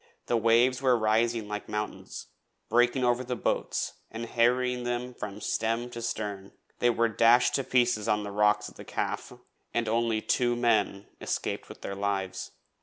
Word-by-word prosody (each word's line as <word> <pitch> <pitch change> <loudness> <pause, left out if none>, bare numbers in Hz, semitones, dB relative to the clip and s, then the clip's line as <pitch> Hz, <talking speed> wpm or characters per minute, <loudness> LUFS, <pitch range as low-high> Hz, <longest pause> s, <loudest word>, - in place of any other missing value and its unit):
The 120 - 0
waves 120 +3 +3
were 130 -2 +4
rising 110 0 +1
like 105 0 -5
mountains, 105 0 -5 0.4
breaking 120 +3 +3
over 120 +1 +2
the 125 0 -3
boats - - -2
and 115 +1 -5
harrying 125 +2 +1
them 120 +1 -3
from 105 -3 -6
stem 115 +3 -1
to 120 - -6
stern. 105 -4 -4 0.3
They 120 - +4
were 115 0 +2
dashed 115 +2 +4
to 135 - +1
pieces 120 -4 +2
on 105 0 +1
the 100 - -5
rocks 105 +1 +2
of - - -13
the - - -9
Calf, - - -3 0.4
and 120 -1 +1
only 115 0 +1
two 120 +2 +1
men 110 -4 +1 0.2
escaped - - -3
with - - -11
their 100 - -4
lives. 100 -1 -2
115 Hz, 170 wpm, -28 LUFS, 105-120 Hz, 0.4 s, were